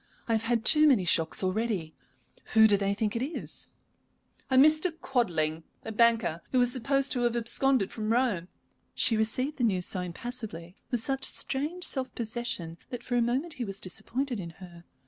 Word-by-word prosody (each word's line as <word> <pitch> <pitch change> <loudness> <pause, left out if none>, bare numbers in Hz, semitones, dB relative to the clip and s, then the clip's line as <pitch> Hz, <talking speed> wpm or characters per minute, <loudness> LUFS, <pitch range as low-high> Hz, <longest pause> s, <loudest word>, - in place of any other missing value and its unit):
I - - -2
have 220 - +1
had 230 0 -1
too 305 0 +7
many 240 -11 +4
shocks 165 +1 +2
already. 185 -4 -1 0.6
Who 220 0 +8
do 205 - +4
they 200 0 0
think 210 +1 -2
it 230 - -1
is?" 300 +5 -4 0.8
"A 260 - +1
Mr. 310 +5 +5
Quadling, 165 - 0 0.2
a 225 - -4
banker, 220 -7 +2
who 255 - +2
is 245 0 +3
supposed 275 +2 0
to 250 - 0
have 240 -1 +1
absconded 235 -1 +2
from 215 -1 -3
Rome." 230 -8 +1 0.5
She 225 - +3
received 255 +7 0
the 245 - -2
news 185 -6 +1
so 185 - -1
impassively, 180 -2 -7
with 245 -3 +1
such 270 +2 -1
strange 305 +7 -2
self 265 -6 -3
possession, 220 -8 -4
that 245 - -6
for 245 - -3
a 240 - +3
moment 260 +8 -1
he - - +1
was 195 -3 -4
disappointed 230 +6 -3
in 170 -3 -6
her. 175 -2 -13
230 Hz, 185 wpm, -28 LUFS, 190-260 Hz, 0.8 s, Who